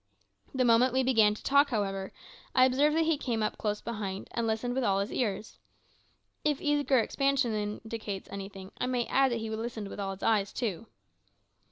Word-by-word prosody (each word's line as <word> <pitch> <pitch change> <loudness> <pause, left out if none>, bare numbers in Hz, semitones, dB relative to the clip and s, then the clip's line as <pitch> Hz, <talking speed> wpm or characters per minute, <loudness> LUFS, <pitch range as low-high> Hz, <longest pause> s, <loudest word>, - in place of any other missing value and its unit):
The 255 -1 +2
moment 240 +2 +4
we 260 0 +2
began 220 -5 +4
to - - -12
talk, 280 +1 +4
however, 195 -4 -2 0.4
I 255 0 +7
observed 285 +4 +3
that 325 - +3
he 320 -3 +1
came 225 -6 0
close 210 -1 -2
up - - -36
behind, 205 -4 -4
and 235 -1 -1
listened 225 +3 -1
with 260 0 0
all 195 -4 +2
his 200 +4 -2
ears. 215 -3 -3 0.8
If 295 -2 +1
eager 290 -2 +2
expansion 275 0 +1
indicates 210 -1 -4
anything, 195 -1 -8
I - - 0
may 250 -2 0
add 270 -1 +3
that 235 - 0
he 220 0 -4
listened 220 -2 -4
with - - -8
all 195 -1 -2
his 190 - -13
eyes 205 -3 +2
too! 220 -2 -3
230 Hz, 190 wpm, -29 LUFS, 205-260 Hz, 0.8 s, I